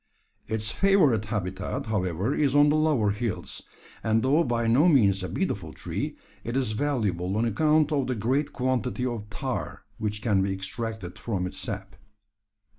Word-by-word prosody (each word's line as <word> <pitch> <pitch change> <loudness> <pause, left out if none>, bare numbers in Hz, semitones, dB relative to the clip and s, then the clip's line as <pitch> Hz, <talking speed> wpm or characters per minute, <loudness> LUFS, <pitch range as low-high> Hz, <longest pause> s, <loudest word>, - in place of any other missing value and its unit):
Its 110 0 -1
favourite 160 - +3
habitat, 95 -3 -3
however, 100 - -1
is 145 -3 +1
on 145 0 +6
the 150 - +3
lower 150 -10 +2
hills, 105 0 -3 0.4
and 110 0 +2
though 145 +6 +4
by 120 -3 0
no 125 +9 +5
means 100 - +4
a 90 - -4
beautiful - - -2
tree, - - -4 0.3
it 120 +3 -2
is 130 -5 +1
valuable 105 -8 -1
on 115 - +2
account 155 +6 +3
of 140 -3 +1
the 130 - -1
great 130 +7 0
quantity 130 -1 -1
of 115 -4 -4
tar 105 - -4 0.2
which 105 -1 -3
can 105 -5 +3
be 95 0 0
extracted 95 -1 -4
from 95 -6 -2
its 90 - -5
sap. 100 -5 -6
115 Hz, 165 wpm, -27 LUFS, 100-135 Hz, 0.4 s, on